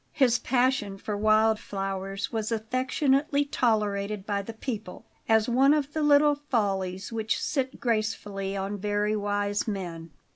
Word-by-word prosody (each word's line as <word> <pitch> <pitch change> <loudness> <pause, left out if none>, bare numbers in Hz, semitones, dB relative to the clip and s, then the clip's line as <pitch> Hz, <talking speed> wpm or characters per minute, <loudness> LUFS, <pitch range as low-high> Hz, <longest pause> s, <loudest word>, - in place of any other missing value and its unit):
His 250 -5 +3
passion 245 -5 +1
for 210 +1 -4
wild 215 +1 +3
flowers 195 0 -4
was 220 0 -2
affectionately 265 +5 +1
tolerated 210 -6 0
by 205 -1 -1
the 200 - -7
people, 220 -5 -6 0.2
as 220 -1 +4
one 265 +4 +4
of 290 -1 -2
the 315 - -1
little 295 0 +5
follies 200 -9 -2
which 220 -1 -1
sit 265 -3 -2
gracefully 210 -4 -2
on 195 +1 -3
very 210 +1 0
wise 205 0 -1
men. 175 -5 -5
215 Hz, 140 wpm, -27 LUFS, 200-255 Hz, 0.2 s, little